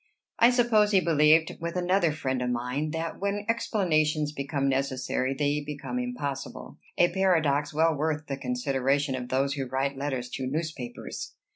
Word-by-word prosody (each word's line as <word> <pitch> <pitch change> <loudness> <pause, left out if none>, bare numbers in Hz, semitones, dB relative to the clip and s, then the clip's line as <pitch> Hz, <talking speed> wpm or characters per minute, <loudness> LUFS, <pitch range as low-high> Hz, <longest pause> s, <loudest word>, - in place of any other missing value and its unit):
I 235 - +7
suppose 235 -4 +4
he 200 -2 +5
believed, 160 -1 +4
with 170 +1 -3
another 180 -1 +2
friend 130 -4 -2
of 125 - -1
mine, 125 +5 -2
that 165 +1 -4
"when 200 +1 -2
explanations 155 -10 +1
become 140 -1 -2
necessary, 135 -1 -1
they 145 +1 0
become 150 - -4
impossible," 145 - -5 0.2
a 175 - +4
paradox 155 -7 +2
well 160 +2 +3
worth 155 +1 -1
the 140 - -3
consideration 135 +2 0
of 125 -1 -4
those 135 +1 +1
who 135 -2 -3
write 135 +1 -2
letters 135 -3 -2
to 130 +1 -4
newspapers. 145 -4 -5
150 Hz, 155 wpm, -27 LUFS, 135-170 Hz, 0.2 s, I